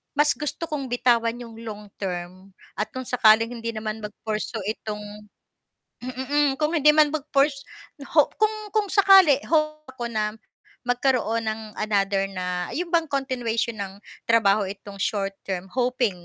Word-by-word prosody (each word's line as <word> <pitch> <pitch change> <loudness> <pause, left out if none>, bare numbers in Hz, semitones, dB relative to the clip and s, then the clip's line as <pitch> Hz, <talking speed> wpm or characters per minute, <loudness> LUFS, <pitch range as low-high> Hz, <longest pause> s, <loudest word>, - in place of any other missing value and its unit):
mas 295 +1 +4
gusto 300 +2 -4
kong 285 -4 -4
bitawan 235 -1 +2
'yong 230 -2 -10
long 210 -2 -8
term 185 0 -6 0.2
at 210 - 0
kung 260 - -3
sakaling 225 -1 +5
hindi 230 -1 -4
naman 215 0 -4
mag-pursue 215 +1 -4 0.2
itong 210 -1 -5 1.0
hmm, 255 +1 -5
mm, 290 0 +3
kung 310 +2 +1
hindi 300 0 +6
man 305 -1 +5
mag-purs 280 -1 +1 0.3
na 280 - -9
ho 300 -2 +5
kung 430 0 +3 0.2
kung 425 -2 0
sakali 385 -8 +7
hope 305 -1 0
ako 245 -2 -5
na 215 0 -1 0.5
magkaroon 245 -2 +1
ng 220 +1 -2 0.2
another 200 -2 +1
na, 180 -1 -3
'yon 350 +2 -2
bang 330 -2 +2
continuation 245 -5 -1
ng 195 0 -6 0.3
trabaho 210 -3 +4
itong 200 0 -9
short-term, 195 -2 -2
hoping 245 -8 0
230 Hz, 150 wpm, -24 LUFS, 210-280 Hz, 1.0 s, sakali